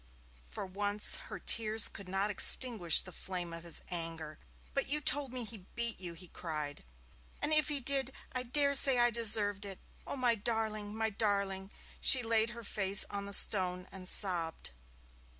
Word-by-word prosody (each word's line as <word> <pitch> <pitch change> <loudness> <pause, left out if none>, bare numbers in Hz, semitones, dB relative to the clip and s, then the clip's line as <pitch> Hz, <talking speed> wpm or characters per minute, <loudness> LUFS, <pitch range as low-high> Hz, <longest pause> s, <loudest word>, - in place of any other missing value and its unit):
For - - -10
once 205 +2 +2
her - - -9
tears 220 -1 +4
could 195 -2 -12
not 195 +2 -3
extinguish 210 -5 +4
the 185 - -12
flame 175 -1 -7
of 165 - -9
his 170 -1 -5
anger. 165 -3 -7 0.3
'But 275 - -3
you 295 +2 -1
told 285 -2 +1
me 250 -1 -5
he 210 -4 -9
beat 235 -4 -2
you,' 175 -2 -8
he 180 +2 -12
cried. 150 -4 -8 0.6
'And 310 - -3
if 305 0 +1
he 295 -2 -3
did, 270 0 +2 0.2
I 255 - -5
dare 280 +3 0
say 270 -2 +5
I 240 0 +1
deserved 210 -3 +2
it. 195 -2 -7 0.3
Oh, - - -7
my 250 -3 0
darling, 215 -1 -5
my 220 0 -4
darling!' 200 -2 -4 0.3
She 255 -2 +5
laid 225 0 -1
her 235 0 -12
face 200 -1 +3
on 200 0 -6
the - - -7
stone 180 -3 +3
and 185 -1 -6
sobbed. 170 - +1
205 Hz, 175 wpm, -30 LUFS, 185-235 Hz, 0.6 s, say